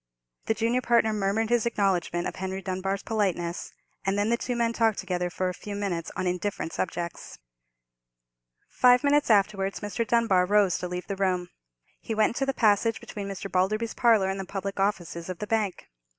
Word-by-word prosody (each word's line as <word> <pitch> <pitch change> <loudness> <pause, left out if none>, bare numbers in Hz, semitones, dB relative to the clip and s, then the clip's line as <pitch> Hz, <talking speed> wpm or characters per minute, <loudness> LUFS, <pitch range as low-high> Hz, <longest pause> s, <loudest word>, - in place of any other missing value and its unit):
The 220 - +2
junior 230 +3 +1
partner 235 -3 +3
murmured 210 +2 0
his 235 -1 +3
acknowledgment 185 -6 0
of - - -6
Henry 190 0 -3
Dunbar's 195 +1 -2
politeness; 185 -6 -1 0.3
and 195 +1 0
then 205 +2 +1
the - - +4
two 245 0 -3
men 235 -1 +1
talked 225 -3 +2
together 180 -2 -2
for 185 +1 -2
a 180 - -2
few 205 +3 -7
minutes 185 -5 -2
on - - -2
indifferent 180 -1 -2
subjects. 170 -2 -4 1.3
Five 250 +1 +4
minutes 290 -1 +3
afterwards 200 -2 +2
Mr. 210 +2 -2
Dunbar 205 -6 +3
rose 200 -3 +3
to 180 - -3
leave 180 0 -5
the 200 - -4
room. 185 -2 0 0.5
He 225 - -4
went 215 0 +3
into 270 +4 -2
the - - +3
passage 220 0 +3
between 200 -1 -7
Mr. 195 0 -5
Balderby's 215 +5 0
parlour 220 -5 +3
and 195 - -4
the - - -2
public 195 +1 -5
offices 175 -4 -1
of 185 - -4
the 210 - -4
bank. 210 -4 -1
200 Hz, 185 wpm, -27 LUFS, 185-225 Hz, 1.3 s, the